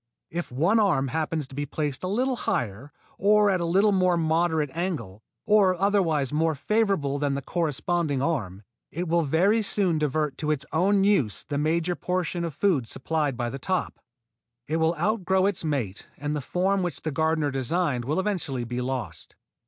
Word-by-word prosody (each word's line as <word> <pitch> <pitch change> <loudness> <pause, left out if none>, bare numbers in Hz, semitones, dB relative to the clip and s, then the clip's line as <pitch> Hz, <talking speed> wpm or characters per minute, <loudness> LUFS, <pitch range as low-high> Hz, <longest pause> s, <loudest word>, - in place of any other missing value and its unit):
If 175 -3 -4
one 170 - +2
arm 150 -11 +2
happens 155 +1 -1
to 135 - -15
be 145 +1 -3
placed 145 -2 -3
a - - -1
little 250 +7 0
higher, 120 - -3 0.3
or 205 +1 +4
at 185 -2 0
a - - 0
little 195 +5 +3
more 185 -2 +3
moderate 160 -2 +1
angle, 165 - -4 0.2
or 195 -4 +4
otherwise 170 -9 +1
more 160 +1 +1
favorably 175 -5 0
than 140 -1 0
the 140 - -3
corresponding 165 -1 -1
arm, 110 - -2 0.3
it 175 +3 -4
will 170 +1 +2
very 180 +9 +2
soon 190 -6 +1
divert 150 -1 -1
to 155 - -2
its 150 -1 0
own 195 +4 +3
use 185 - +1
the 145 -1 -1
major 165 +3 0
portion 180 -1 -2
of 165 -4 -4
food 155 - +1
supplied 145 +1 -1
by 120 -1 -2
the 135 - -6
top. 185 +6 -2 0.7
It 160 - 0
will 160 +1 +2
outgrow 190 0 +1
its 200 -4 0
mate 130 -11 -3
and 145 +1 -3
the 145 - -2
form 190 +7 0
which 175 -4 -3
the 155 - -2
gardener 160 -1 +1
designed 135 0 0
will 150 +7 0
eventually 175 -11 -2
be 120 +1 -3
lost. 125 - -5
160 Hz, 180 wpm, -26 LUFS, 140-185 Hz, 0.7 s, or